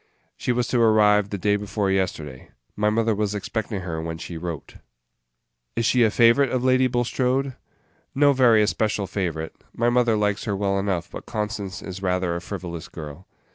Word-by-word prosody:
"She - - -2
was 120 -1 0
to 120 - +2
arrive 105 -2 +4
the 100 - -3
day 105 +2 +1
before 105 -1 -1
yesterday. 80 -8 -3 0.3
My 105 0 +2
mother 115 +1 +1
was 105 0 -1
expecting 105 0 -3
her 85 -3 -4
when 80 0 -4
she 85 - -7
wrote." 85 -2 -6 1.0
"Is 115 - 0
she 125 +1 +3
a 115 - +5
favorite 115 +5 +4
of 125 0 -1
Lady 130 0 +4
Bulstrode?" 125 +2 0 0.6
"No 145 +1 +5
very 120 -5 +5
especial 105 -1 0
favorite. 85 -5 -3 0.2
My 120 +1 +2
mother 120 -2 +3
likes 105 -1 0
her 105 -3 -1
well 100 0 0
enough; 95 -2 -2
but - - -9
Constance 105 -3 -4
is 95 0 -7
rather 90 -2 0
a 85 - -4
frivolous 90 -3 -6
girl." 75 +3 -9
105 Hz, 175 wpm, -24 LUFS, 90-115 Hz, 1.0 s, a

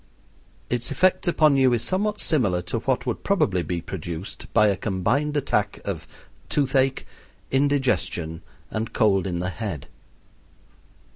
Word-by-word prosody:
Its 120 -1 0
effect 185 +6 +2
upon 155 -4 +4
you 130 -2 +4
is 115 - 0
somewhat 210 +3 0
similar 100 - +1
to - - -2
what - - -1
would - - -3
probably 90 -2 +2
be 85 0 -3
produced 85 +1 -6
by 105 -2 +5
a 100 -2 +3
combined 120 +11 0
attack 105 -7 0
of - - -4 0.4
toothache, 135 -2 +1 0.5
indigestion, 135 - +1 0.3
and 110 +1 -3
cold 100 -4 +3
in 90 -2 -2
the 90 +1 -2
head. 95 -8 -5
115 Hz, 135 wpm, -24 LUFS, 95-140 Hz, 0.5 s, by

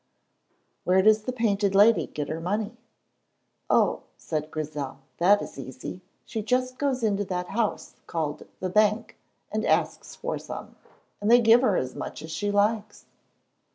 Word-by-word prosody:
"Where 185 +1 +3
does 215 0 +4
the 255 - -1
Painted 205 -5 +1
Lady 210 +3 +5
get 150 -1 -4
her 155 +2 -4
money?" 210 +6 -2 0.9
"Oh," - - +3 0.2
said 155 -1 -3
Grizel, 150 -4 -5 0.2
"that 200 +4 +5
is - - -9
easy. 130 +7 -7 0.2
She 225 - -4
just 255 +3 -1
goes 270 -4 0
into 205 -2 +1
that 180 -1 -3
house 220 0 -2
called 155 -3 -3
the 185 - -2
bank, 215 +3 +2 0.4
and - - -1
asks - - 0
for - - -3
some, - - -8 0.5
and 205 - 0
they 240 +1 +8
give 230 +1 +6
her 210 -8 +3
as 130 0 -2
much - - -6
as 160 - -8
she 205 +6 -2
likes." 205 +1 0
205 Hz, 155 wpm, -26 LUFS, 165-225 Hz, 0.9 s, they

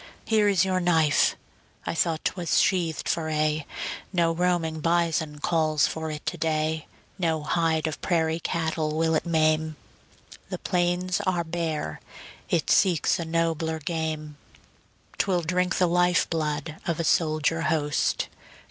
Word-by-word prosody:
Here 215 -2 +3
is 190 -2 +3
your 185 -1 +1
knife! 160 -4 +3 0.5
I - - -2
thought 165 -1 0
'twas 175 -3 +1
sheathed 175 -4 +1
for 160 -1 0
aye. 155 -1 0 0.4
No 170 -3 +2
roaming 165 -2 0
bison 165 -2 0
calls 155 -1 +2
for 160 0 -3
it 150 -1 -6
to 175 - -3
day; 155 -1 -1 0.3
No 160 -3 0
hide 160 0 +1
of 155 -1 -3
prairie 160 -2 +1
cattle 160 -3 -1
will 160 0 +2
it 160 - 0
maim; 155 -1 +2 0.7
The - - -3
plains 180 +1 0
are 175 -2 +1
bare, 160 - -3 0.5
it 165 -3 +1
seeks 175 -1 +3
a 170 - -3
nobler 160 -1 0
game: 155 -1 -4 0.8
'Twill 180 -3 +1
drink 180 +3 0
the 185 - +4
life 175 +1 +3
blood 155 -1 -2
of 170 -2 -1
a - - 0
soldier 155 0 +1
host. 150 -3 0
160 Hz, 140 wpm, -26 LUFS, 155-175 Hz, 0.8 s, the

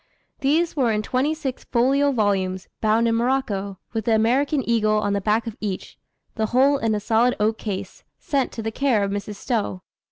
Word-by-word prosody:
These 315 +5 +1
were 255 -6 +2
in 215 0 0
twenty 265 +7 0
six 270 -5 -5
folio 275 +4 +2
volumes, 195 -5 0
bound 220 +2 +3
in 230 - +2
morocco, 230 -5 -1 0.2
with 220 -2 -2
the 225 - +3
American 260 +5 +1
eagle 215 -2 +2
on 205 -1 0
the 200 - 0
back 215 +3 +1
of 225 -2 -5
each, 200 -3 -5 0.3
the 220 -1 -1
whole 270 +4 +3
in 225 -3 +1
a - - -1
solid 230 +4 +2
oak 220 +1 +1
case, 195 -2 -5
sent 275 -3 -1
to 225 - -5
the 225 - -2
care 245 -4 +1
of 200 - -1
Mrs. 205 +1 -4
Stowe. 205 -5 -2
225 Hz, 195 wpm, -23 LUFS, 210-260 Hz, 0.3 s, bound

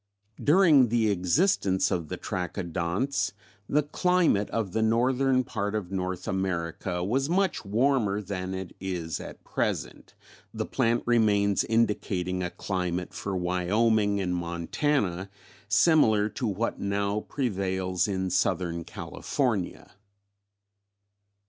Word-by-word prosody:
"During 150 -5 +6
the 110 -2 +2
existence 95 - +2
of 85 -3 -1
the - - -5
Trachodonts 90 - -2 0.4
the 150 +1 +3
climate 170 - +2
of 110 -5 -2
the 110 - +1
northern 130 +3 +2
part 105 -3 -3
of 95 -4 -3
North 90 -1 -3
America 90 -1 -2
was 135 - 0
much 190 0 +1
warmer 110 -1 +1
than 95 -2 -4
it 95 -1 -7
is 85 -5 -3
at - - -10
present, - - -3 0.4
the - - -3
plant 115 +1 +1
remains 105 -4 +3
indicating 100 -5 0
a 90 - -1
climate 90 -2 -3
for 100 -2 -3
Wyoming 100 +4 +1
and 90 -2 -1
Montana 90 - -1 0.4
similar 110 - +4
to 120 +2 -3
what 105 +3 -2
now 100 +1 0
prevails 95 -7 -1
in 95 -2 -2
Southern 85 -2 0
California. 110 - -3
100 Hz, 115 wpm, -27 LUFS, 90-115 Hz, 0.4 s, During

